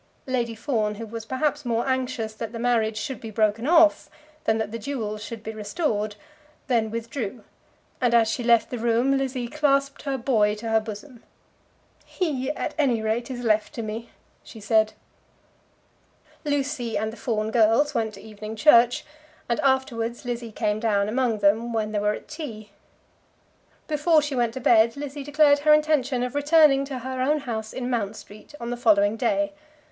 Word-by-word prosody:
Lady 240 -3 -1
Fawn, 220 -4 -1
who 225 +2 -6
was 225 0 -7
perhaps 290 +3 -1
more 235 0 -1
anxious 255 -4 -2
that 225 +1 -6
the - - -5
marriage 230 -2 +1
should 265 +3 -4
be 225 - -7
broken 215 +3 0
off 325 -1 +4 0.4
than 220 - +2
that 220 -1 -3
the 230 - -5
jewels 215 -4 -4
should 225 0 -8
be 220 - -5
restored, 215 - -2 0.5
then 230 -4 +1
withdrew; 230 0 -5 0.6
and 240 -2 +3
as 230 -1 +5
she 235 +2 -2
left 235 -1 +3
the 245 - -3
room 235 +4 +2
Lizzie 260 -2 -2
clasped 275 0 +1
her 275 -2 -2
boy 220 -5 +2
to 225 +2 -6
her 225 0 +4
bosom. 225 +3 -9 0.8
"He, 285 -7 -2
at - - -4
any 255 -6 +2
rate, 225 +4 -1
is 250 -2 -5
left 215 +3 +1
to 230 - -4
me," 220 +2 -6 0.3
she 225 - -12
said. 215 +1 +2 1.5
Lucy 280 -6 -1
and 220 +1 -2
the - - -8
Fawn 220 -3 -2
girls 235 +6 +3
went 220 -4 -1
to - - -12
evening 215 0 -8
church, 240 -1 +5 0.4
and 235 - 0
afterwards 245 -3 0
Lizzie 240 -2 -4
came 210 0 -1
down 210 -3 +1
among 240 -1 0
them 220 +4 +2
when 215 -1 -1
they 210 - 0
were 210 +1 +1
at - - -11
tea. 235 -10 -8 1.2
Before 310 +1 +3
she 290 -1 -3
went 240 -3 0
to - - -3
bed 230 0 +4
Lizzie 285 0 -6
declared 290 0 +4
her 300 +1 +5
intention 290 -5 +1
of 250 - -3
returning 290 -1 +4
to 275 -2 -5
her 260 +1 -4
own 295 +3 +1
house 220 -5 -4
in 250 -1 -4
Mount 220 -3 -1
Street 210 +9 -13
on 235 0 -5
the 245 - -3
following 210 -3 +3
day. 295 +5 0
235 Hz, 180 wpm, -25 LUFS, 220-275 Hz, 1.5 s, as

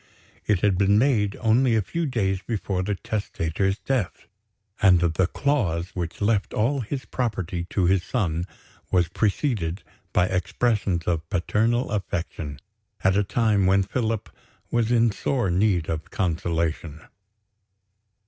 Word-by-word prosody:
It 105 -4 +2
had 100 -3 +2
been 100 +1 +4
made 105 -5 +2
only 115 +1 +3
a 110 - +3
few 165 - -2
days 95 -7 0
before 100 -4 -2
the 100 +2 -1
testator's 95 -2 -2
death; 125 -9 -2 0.6
and 95 -4 +6
the 85 +1 +2
clause 95 - 0
which 85 0 -5
left 100 -1 +1
all 130 +6 +1
his 130 +3 -4
property 95 -8 -3
to 95 - +1
his 95 +1 +3
son 85 -4 -1 0.4
was 90 -2 +2
preceded 100 - -1 0.3
by 90 - +3
expressions 95 0 0
of 80 -2 -1
paternal 115 +8 +1
affection, 85 -8 -3 0.4
at 95 0 +4
a 105 - +3
time 105 -2 +2
when 95 +1 +4
Philip 115 +1 -2 0.4
was 120 -1 +1
in 115 -1 +4
sore 120 -1 -1
need 90 -3 +2
of 80 -1 -4
consolation. 85 -3 -2
100 Hz, 135 wpm, -25 LUFS, 85-115 Hz, 0.6 s, and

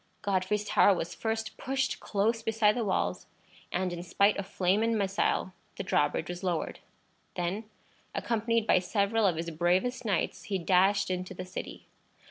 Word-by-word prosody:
Godfrey's 200 +1 0
tower 205 -1 +5
was 165 - -4
first 220 0 -3
pushed 270 0 -1
close 225 +3 0
beside 220 -1 +3
the 240 - 0
walls, 90 - -1 0.4
and 180 0 -1
in 170 - -5
spite 200 +4 +3
of 200 -1 -4
flame 195 +1 +1
and 225 0 +2
missile 195 -2 0 0.2
the - - -4
drawbridge 145 0 +1
was 175 0 -5
lowered. 175 -3 -2 0.6
Then, 180 +5 -2 0.5
accompanied 230 -1 0
by - - +5
several 200 +3 +1
of 180 - +1
his 165 +1 -3
bravest 180 +10 +1
knights, 185 -4 -1
he 195 0 -1
dashed 190 +2 +3
into 185 +1 -4
the 185 - -6
city. 185 - -7
195 Hz, 160 wpm, -29 LUFS, 180-220 Hz, 0.6 s, tower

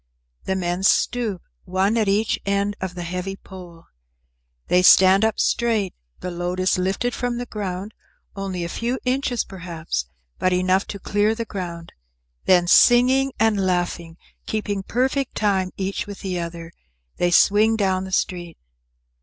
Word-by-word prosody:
The 190 - -1
men 175 0 -2
stoop, 210 -1 +1 0.2
one 190 +4 +1
at 220 -3 +1
each 205 +3 +1
end 200 +1 0
of 185 -1 -4
the 175 - -5
heavy 180 +3 -4
pole. 175 -4 -13 0.8
They 180 - +4
stand 190 +2 +7
up 220 0 +1
straight, 225 -6 +1 0.3
the 180 - -4
load 175 +1 -3
is 185 0 +2
lifted 195 +7 -1
from 245 -1 -2
the 245 - -4
ground, 200 -2 -5 0.4
only 190 -3 -4
a - - -2
few 235 +8 -2
inches 255 -1 0
perhaps, 170 - -5 0.3
but 185 - +2
enough 185 +1 +1
to 200 - -6
clear 205 +3 +1
the 230 0 -4
ground, 175 -5 -7 0.5
then, 180 -2 +5
singing 255 +7 +5
and 215 -3 +2
laughing, 175 -2 -2 0.3
keeping 205 -2 -2
perfect 260 +6 -1
time 195 -3 +1
each 195 +1 -3
with 205 -1 -8
the 185 -2 -3
other, 170 0 -6 0.5
they 175 - +2
swing 210 +5 +4
down 190 -3 0
the 190 - -8
street. 175 -3 -2
190 Hz, 155 wpm, -22 LUFS, 180-215 Hz, 0.8 s, stand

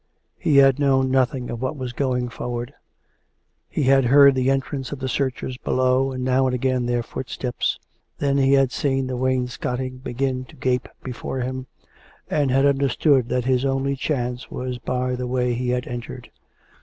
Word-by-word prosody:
He 145 -3 +2
had 135 0 +6
known 135 -2 +2
noth 130 0 +2
ing 125 -2 -5
of 120 0 -5
what 130 +3 -2
was 130 -2 -5
going 125 -2 -1
forward. 120 +1 -5 1.0
He - - -1
had 135 0 +4
heard 140 +2 +7
the 130 0 +1
en 135 0 +3
trance 135 0 -6
of 145 - -4
the 130 0 -4
searchers 130 -1 -2
below, 130 +1 +1
and 130 -1 -4
now 130 +1 +2
and 125 - 0
again 130 -1 0
their 120 -1 0
footsteps.... 125 0 -3 0.4
Then 140 -1 +1
he 135 0 +4
had 135 -2 +4
seen 135 -1 0
the 130 0 -3
wainscoting 130 0 -2
begin 130 0 -2
to 120 - -16
gape 125 -1 -1
before 130 +1 -4
him, 130 +1 -4 0.6
and 145 -3 +2
had 135 +2 +3
understood 140 -1 +2
that 125 -1 0
his 130 -1 +2
only 135 0 0
chance 125 -3 -3
was 125 -1 -4
by 125 +1 -1
the 125 0 -4
way 125 -1 0
he 125 +1 -2
had 125 0 -1
entered. 120 -1 -7
130 Hz, 180 wpm, -23 LUFS, 125-135 Hz, 1.0 s, heard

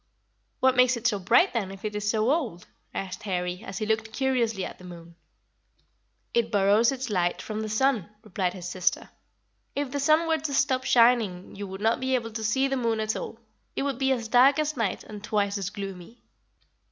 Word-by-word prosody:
"What 260 0 +4
makes 250 -1 +4
it 235 - -10
so 215 -4 +2
bright, 235 - +4
then, 215 -6 -1
if 195 +2 -9
it 210 -1 -3
is 210 0 -1
so 220 +3 +2
old?" 250 - -2 0.3
asked 190 +2 -5
Harry, 180 -2 -3
as 195 - -7
he 215 - -2
looked 220 0 -1
curiously 235 -5 0
at - - -9
the - - -14
moon. 170 -1 -11 1.2
"It 230 -1 +1
borrows 205 +3 +4
its 260 -3 -4
light 175 -3 +1
from 215 -1 -5
the 215 - -4
sun," 220 -3 +1
replied 190 -4 -2
his 180 -1 -6
sister; 180 0 -1 0.6
"if 285 -2 -2
the 285 - -2
sun 310 +3 +3
were 320 -1 +2
to 285 -1 -3
stop 260 -2 +1
shining 230 -7 +3
you 205 0 -6
would 190 +1 -8
not 225 +2 +2
be 260 0 0
able 230 -2 -2
to 220 0 -5
see 265 +5 +2
the 270 0 -1
moon 230 -3 0
at 215 0 -1
all. - - -6 0.4
It - - -1
would 275 -3 -2
be 270 0 +2
as 235 -4 -1
dark 255 +4 +5
as 305 0 0
night 225 -7 -1
and 210 -1 -10
twice 205 -1 0
as 195 -1 -3
gloomy." 195 +2 -8
220 Hz, 210 wpm, -26 LUFS, 195-260 Hz, 1.2 s, dark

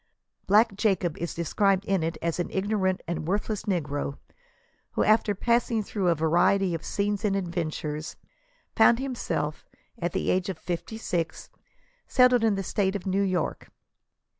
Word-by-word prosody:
Black 210 +1 +4
Jacob 190 -6 +1
is 170 - -4
described 195 +3 +1
in 195 -3 +1
it 165 +1 -2
as 170 +1 -1
an 175 - -1
ignorant 190 -1 0
and 165 -2 -3
worthless 205 +2 -1
negro, 145 -7 -2 0.8
who, - - +1
after 215 -1 +3
passing 235 +1 +1
through 195 -2 -2
a 170 - +4
variety 175 +4 +2
of 165 - -4
scenes 205 0 -1
and 200 -2 +1
ad 185 -3 -3
ventures, 155 -2 -4 0.6
found 225 +1 +6
himself, 245 - -3 0.4
at 175 -1 -1
the - - 0
age 185 0 0
of 185 - -4
fifty 175 +6 -5
six, 170 -7 -3 0.6
settled 250 -2 +4
in 220 -3 +3
the 195 - -2
State 190 +1 0
of 195 - -4
New 195 +1 +1
York. 185 -2 -1
190 Hz, 160 wpm, -27 LUFS, 170-210 Hz, 0.8 s, found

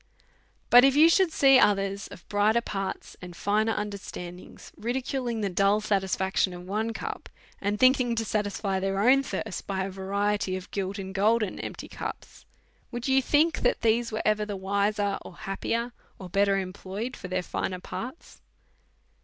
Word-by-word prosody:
But 245 +1 +9
if 270 0 +5
you 315 +3 +7
should 375 -1 +4
see 270 -4 +6
others 195 -1 +2
of 170 - -13
brighter 210 +3 +3
parts 195 -4 -5
and 180 -1 -9
finer 215 +4 +1
understandings 195 -4 -7
ridiculing 245 -1 -2
the 200 - 0
dull 195 +3 +3
satisfaction 190 -2 0
of 175 0 -9
one 215 +4 -1
cup, 225 - -6 0.3
and 205 +1 -1
thinking 255 -2 +4
to 225 0 -1
satisfy 205 -2 -1
their 195 0 -1
own 255 +6 +5
thirst 220 -7 -5
by 190 -1 -1
a 195 - -4
variety 200 0 -1
of 185 0 -8
gilt 195 0 -3
and 190 -1 -6
golden 210 +1 +1
empty - - -6
cups, - - -8 0.4
would 240 +1 -5
you 265 0 +4
think 305 +5 +2
that 245 - +1
these 230 +1 +2
were 220 - -2
ever 215 0 +2
the 205 -2 -4
wiser, 200 +1 0
or - - -11
happier, 230 +5 -3 0.2
or 185 - -9
better 200 +2 +2
employed, 195 +5 -5
for - - -8
their 185 0 -1
finer 185 +1 -3
parts 250 - -8
205 Hz, 165 wpm, -27 LUFS, 195-235 Hz, 0.4 s, But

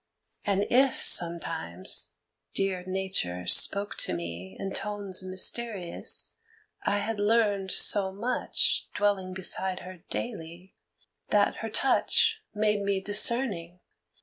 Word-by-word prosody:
And 200 0 0
if, 260 +1 +3
sometimes, 120 - +1 0.4
dear 190 -2 -1
Nature 185 - -2
spoke 200 +1 +3
to 90 - +2
me 85 +2 -8
In 195 - -5
tones 205 -3 -2
mysterious, 185 0 0 0.5
I 205 - -1
had 215 +1 -4
learned 205 -2 +1
so 190 0 +5
much 230 +6 -1
Dwelling 195 -3 -1
beside 190 0 -1
her 185 0 -10
daily, 180 -5 -7 0.6
that - - +1
her - - -6
touch 455 -2 +1
Made 210 -1 0
me 200 -1 -1
discerning. 205 -4 +2
195 Hz, 110 wpm, -27 LUFS, 180-210 Hz, 0.6 s, so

